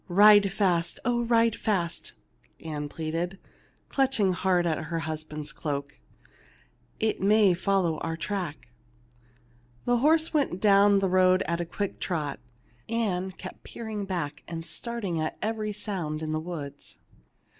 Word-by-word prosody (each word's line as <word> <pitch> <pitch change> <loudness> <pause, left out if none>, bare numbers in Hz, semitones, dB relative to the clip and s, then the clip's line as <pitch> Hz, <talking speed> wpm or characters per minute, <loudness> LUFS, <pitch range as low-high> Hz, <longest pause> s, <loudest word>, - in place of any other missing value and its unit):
"Ride 205 +1 +7
fast! 175 -4 +1
oh, 240 -1 +2
ride 230 -1 +3
fast!" 175 -6 -2 0.5
Ann 150 -2 -5
pleaded, 165 +4 -3 0.5
clutching 255 -9 +2
hard 180 -1 +2
at 160 -2 -1
her 165 +1 -2
husband's 155 -1 -5
cloak. 140 - -4 1.0
"It 220 0 0
may 205 -1 +5
follow 185 -3 +1
on - - -20
our 165 0 -3
track." 170 - -4 1.2
The 245 0 +3
horse 315 +6 +3
went 280 - +1
down 200 0 +5
the 195 0 +2
road 185 0 +4
at 170 0 -1
a - - -2
quick 200 +4 -4
trot. 155 -6 -2 0.5
Ann 190 -5 -1
kept 185 - -9
peering 215 -3 -5
back 170 -6 -3
and 165 -1 -5
starting 195 0 -3
at 155 - -3
every 215 -1 -2
sound 175 -7 -4
in 155 - -3
the 155 - 0
woods. 150 -4 -7
185 Hz, 140 wpm, -27 LUFS, 165-210 Hz, 1.2 s, Ride